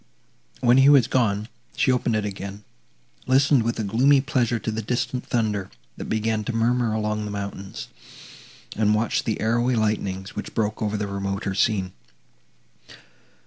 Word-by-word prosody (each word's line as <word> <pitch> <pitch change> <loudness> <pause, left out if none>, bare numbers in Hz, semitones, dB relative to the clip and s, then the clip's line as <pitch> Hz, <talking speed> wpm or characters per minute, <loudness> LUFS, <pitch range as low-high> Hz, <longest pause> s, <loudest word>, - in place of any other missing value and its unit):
When 120 +1 +5
he 135 +1 +7
was 140 -5 +6
gone, 110 -5 0 0.3
she 130 - +2
opened 125 -2 +1
it 105 -1 0
again, 100 0 -6 0.6
listened 135 0 +4
with 115 +1 -1
a - - -1
gloomy 130 +8 +4
pleasure 130 -4 0
to 110 - -3
the 110 +1 -3
distant 125 +3 -2
thunder, 105 -5 -1 0.3
that - - -7
began 110 0 -1
to 125 - -3
murmur 115 0 +1
among 105 0 -1
the 105 - -5
mountains, 100 -1 -6 0.9
and 105 0 +2
watched 110 +3 0
the 110 -4 -1
arrowy 120 +3 +1
lightnings, 100 -3 -2
which - - -6
broke 110 0 -1
over 105 -1 -1
the 105 - -2
remoter 100 0 -3
scene. 95 -2 +1
110 Hz, 155 wpm, -24 LUFS, 105-120 Hz, 0.9 s, he